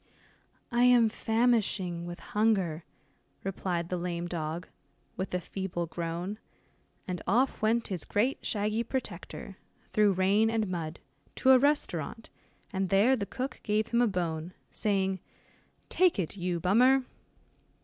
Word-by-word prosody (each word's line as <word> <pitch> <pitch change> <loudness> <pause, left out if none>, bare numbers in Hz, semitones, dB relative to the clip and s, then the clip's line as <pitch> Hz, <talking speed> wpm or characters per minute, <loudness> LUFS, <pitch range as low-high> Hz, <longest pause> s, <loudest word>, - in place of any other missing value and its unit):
"I 240 +1 +4
am 240 -2 +6
famishing 215 -7 +1
with 175 0 -7
hunger," 195 -7 +1 0.6
replied 180 -3 -2
the 180 - -1
lame 175 0 -3
dog, 165 0 -4 0.5
with 190 0 -4
a - - +1
feeble 180 -1 -4
groan, 170 +5 -4 0.7
and 180 -1 -3
off 250 +6 +2
went 225 +2 +1
his 180 -5 -2
great 240 +7 0
shaggy 215 +2 0
protector, 205 -5 -5 0.4
through 210 -2 +4
rain 195 +4 +3
and 225 -2 0
mud, 170 -3 -4 0.3
to 265 - +4
a 260 - +8
restaurant, 235 - 0 0.4
and 190 -1 -1
there 205 +7 +5
the 200 -5 -3
cook 255 +5 -4
gave 215 +1 0
him 235 0 +2
a 240 - +4
bone, 175 -3 -2 0.2
saying, 195 -3 0 0.7
"take 365 -6 +3
it, 185 -2 -2
you 180 -2 -2
Bummer." 250 +9 +4
195 Hz, 135 wpm, -30 LUFS, 175-225 Hz, 0.7 s, a